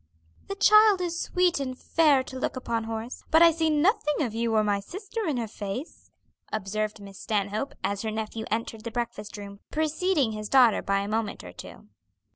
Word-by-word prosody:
"The 395 - -4
child 425 0 +6
is 345 -2 -2
sweet 360 -3 +1
and 255 -2 -4
fair 295 -4 +3
to 260 0 -8
look - - -2
upon, 235 -3 -2
Horace, 225 +2 -5
but 320 +1 +6
I 335 - +8
see 320 0 0
nothing 305 -1 +2
of 235 -5 -3
you 230 0 -1
or 215 - +4
my 205 -1 +1
sister 405 - -5
in 290 -5 0
her 230 -2 -2
face," 210 - -7 0.4
observed 215 +1 -2
Miss 200 -1 -11
Stanhope, 210 +5 -2
as 200 0 -1
her 220 - -2
nephew 220 0 -4
entered 225 0 -3
the 230 - -4
breakfast 230 -3 -5
room, 200 -1 -9
preceding 315 -3 +1
his 215 -1 -5
daughter 250 -5 +5
by 195 0 0
a 200 - -4
moment 215 - -2
or 90 -1 -10
two. 90 +3 -12
230 Hz, 195 wpm, -27 LUFS, 210-315 Hz, 0.4 s, I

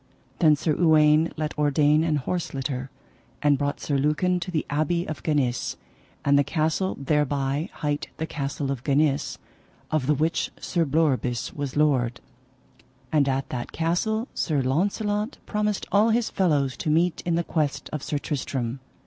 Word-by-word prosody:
Then 155 -4 +6
Sir 155 +1 0
Uwaine 155 -1 +4
let 155 -1 -2
ordain 150 +1 +3
an 160 -2 +1
horse 160 +3 -2
litter, 130 -1 -3 0.5
and 145 -1 +5
brought 145 +1 -2
Sir 140 -2 -1
Lucan 165 +6 +1
to 175 - -5
the 160 -4 -1
abbey 155 +4 0
of 155 - -5
Ganis, 140 -6 0 0.5
and 140 0 +5
the - - +4
castle 160 +5 0
thereby 145 +2 0
hight 145 -1 -2
the 160 - -2
Castle 140 -2 -3
of 130 -2 -4
Ganis, 145 0 +1 0.5
of 155 -4 0
the 150 - +3
which 160 +4 0
Sir 170 -2 0
Bleoberis 135 -5 0
was 145 -2 -4
lord. 130 -6 +2 0.9
And 145 -3 +3
at 135 0 -1
that 120 -2 -5
castle 215 +8 0
Sir 145 -5 0
Launcelot 205 - 0
promised 210 -1 -1
all 210 +3 +4
his 230 0 +1
fellows 145 -8 +1
to - - -2
meet 165 +3 +2
in 170 -1 0
the 170 - +1
quest 145 -4 -1
of 150 - -2
Sir 145 - -2
Tristram. 130 -3 -3
150 Hz, 160 wpm, -25 LUFS, 140-165 Hz, 0.9 s, Then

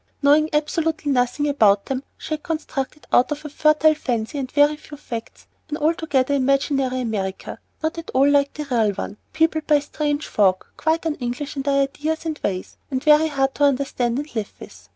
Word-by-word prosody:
Knowing 300 +2 +5
absolutely 305 0 0
nothing 250 +3 +1
about 210 -8 +3
them, 265 -1 -2 0.2
she - - -5
had 305 - -3
constructed 305 -3 -4
out 250 - +4
of 295 +1 -4
a - - -4
fertile 305 +1 +4
fancy 245 -2 -3
and 260 -2 -4
a 290 +1 +5
few 295 0 -12
facts 230 -5 -8 0.2
an 300 - -3
altogether 300 -4 +1
imaginary 270 -1 +1
America, 200 -5 -4 0.2
not 320 +1 -1
at 330 - -9
all 270 +2 +5
like 285 -1 +3
the 300 - -4
real 225 -4 +3
one; 200 +1 -6
peopled 320 -1 +1
by 300 - +5
strange 295 +1 -2
folk 190 -3 +1
quite 320 +2 0
un 320 - +1
English 250 +4 -4
in 275 - -2
their 275 0 +2
ideas 310 +4 -3
and 315 -2 -3
ways, 185 -2 -3
and 260 0 -2
very 305 +1 +5
hard 270 -3 0
to 290 - -1
understand 260 -3 +1
and 295 +2 -5
live 215 -2 -3
with. - - -13
285 Hz, 195 wpm, -22 LUFS, 255-305 Hz, 0.2 s, Knowing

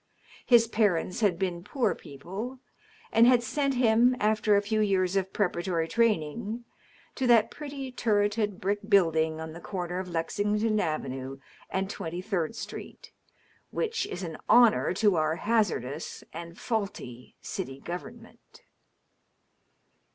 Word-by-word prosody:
His 235 -3 +6
parents 200 -6 +1
had 200 -6 +2
been 175 -2 -2
poor 255 +5 0
people, 195 - -7 0.5
and 230 +1 +6
had 245 -1 +5
sent 275 +3 0
him, 245 +1 +4
after 215 0 +3
a 200 - +4
few 215 +1 0
years 190 -2 +1
of 190 -1 0
preparatory 175 -4 0
training, 225 +2 0 0.5
to 260 - -1
that 230 -3 +5
pretty, 280 -3 -6
turreted 205 -3 0
brick 200 +2 0
building 160 -5 +3
on 160 0 -6
the 170 - -9
corner 180 -2 -4
of 185 -1 -5
Lexington 210 +6 0
Avenue 135 -5 -3 0.3
and 190 0 -1
Twenty 175 -3 -5
Third 185 -1 -2
Street, - - -8 0.6
which 460 0 -1
is 185 - -5
an 165 -3 -5
honor 240 -2 +6
to 200 -2 +3
our" 155 0 +1
hazardous 170 - -1
and 170 +1 -8
faulty 195 - -4
city 135 +1 -5
government. 225 +8 -9
200 Hz, 130 wpm, -28 LUFS, 170-225 Hz, 0.6 s, His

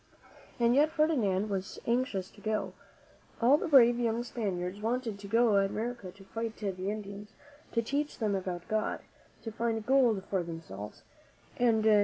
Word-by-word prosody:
And 235 0 +4
yet 295 +4 +5
Ferdinand 245 - +1
was 195 0 -3
anxious 235 -6 0
to 205 - -17
go. 215 0 -2 0.7
All 245 +4 +6
the - - -3
brave 240 -5 +6
young 235 0 0
Spaniards 200 -5 -3
wanted 225 -2 -2
to 200 - -9
go 230 +2 +4
to 200 - +4
America 230 -3 -4
to 195 +1 -16
fight 225 +3 -5
the 205 -2 -2 0.2
Indians, 205 0 -6 0.4
to 230 - +1
teach 285 +5 -2
them 215 -3 0
about 180 -2 -3
God, 215 0 -1 0.4
to 225 - -5
find 225 -1 -2
gold 245 -7 +3
for 190 -2 0
themselves 165 - -8 0.5
and 230 -3 +3
new 220 - +5
■«»! 210 -1 +6
220 Hz, 170 wpm, -30 LUFS, 200-240 Hz, 0.7 s, All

